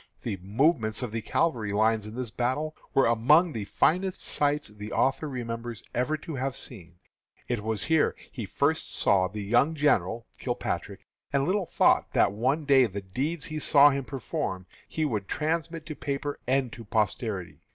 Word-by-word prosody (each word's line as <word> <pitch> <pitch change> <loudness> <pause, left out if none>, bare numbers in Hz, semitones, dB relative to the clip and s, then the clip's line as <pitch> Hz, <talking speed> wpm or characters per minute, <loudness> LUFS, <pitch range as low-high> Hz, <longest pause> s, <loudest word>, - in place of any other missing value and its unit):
The 95 - -2
movements 110 - +1
of 120 - -3
the 115 0 -3
cavalry 120 -10 0
lines 110 +1 +2
in 105 - -8
this 125 -3 -4
battle 130 +7 -1 0.2
were 135 - +5
among 150 +10 +4
the 110 -4 -4
finest 185 - +1
sights 145 0 0
the 105 0 -9
author 135 +3 +1
remembers 115 -3 -5
ever 140 +6 0
to 165 - -5
have 135 +1 -2
seen. 90 -11 -8 0.5
It 120 -3 -1
was 110 -2 -2
here 160 -1 +2 0.2
he 115 -7 -6
first 150 +9 0
saw 95 -2 +3
the 105 +2 -6
young 120 +10 +2
general 120 - +1
(Kilpatrick), - - -3 0.3
and 140 -1 +2
little 185 0 0
thought - - +3
that - - +4
one 130 +9 0
day 135 -3 +5
the 100 -1 -5
deeds 140 - -3
he 155 0 -4
saw 145 -1 +6
him 140 0 -2
perform 95 -8 -4 0.2
he 155 - -1
would 105 -8 -2
transmit 165 +1 -2
to 155 - -6
paper 140 0 -3
and 130 -2 +1
to 115 - -9
posterity. 105 -3 -2
125 Hz, 170 wpm, -27 LUFS, 110-150 Hz, 0.5 s, saw